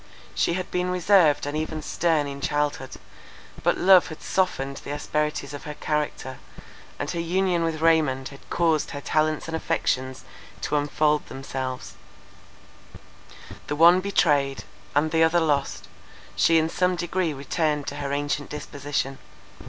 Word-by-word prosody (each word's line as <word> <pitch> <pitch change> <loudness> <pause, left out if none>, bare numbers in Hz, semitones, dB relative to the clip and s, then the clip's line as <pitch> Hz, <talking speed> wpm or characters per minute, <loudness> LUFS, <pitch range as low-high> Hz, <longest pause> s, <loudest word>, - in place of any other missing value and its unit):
She - - +1
had 185 +1 -4
been 180 0 0
reserved 180 -5 +4
and 145 +1 -3
even 155 0 -3
stern 160 -3 +1
in 140 0 -6
childhood; 145 -2 -1 0.7
but - - +2
love 185 -1 +6
had 155 - -9
softened 140 -8 -1
the - - -9
asperities 150 0 -2
of 145 - -8
her 150 0 -6
character, 150 -4 -3 0.6
and 145 - -3
her 170 - -3
union 175 0 +1
with 160 -1 -2
Raymond 155 -5 +2
had 140 - -15
caused 165 -3 +1
her 145 - -5
talents 155 +1 0
and 165 - -3
affections 130 -5 -1 0.4
to 150 - -1
unfold 150 +1 +1
themselves; 130 -1 -5 1.7
the 145 - -2
one 170 +4 +7
betrayed, 145 -8 +1 0.3
and 155 +2 +2
the 160 0 +2
other 160 +2 +4
lost, 145 -4 -1 0.5
she 165 - +4
in 160 0 +3
some 180 +2 +1
degree 175 0 -1
returned 150 +1 -1
to 145 - -5
her 140 -1 -3
ancient 145 0 -2
disposition. 140 -2 -4
150 Hz, 145 wpm, -25 LUFS, 145-165 Hz, 1.7 s, one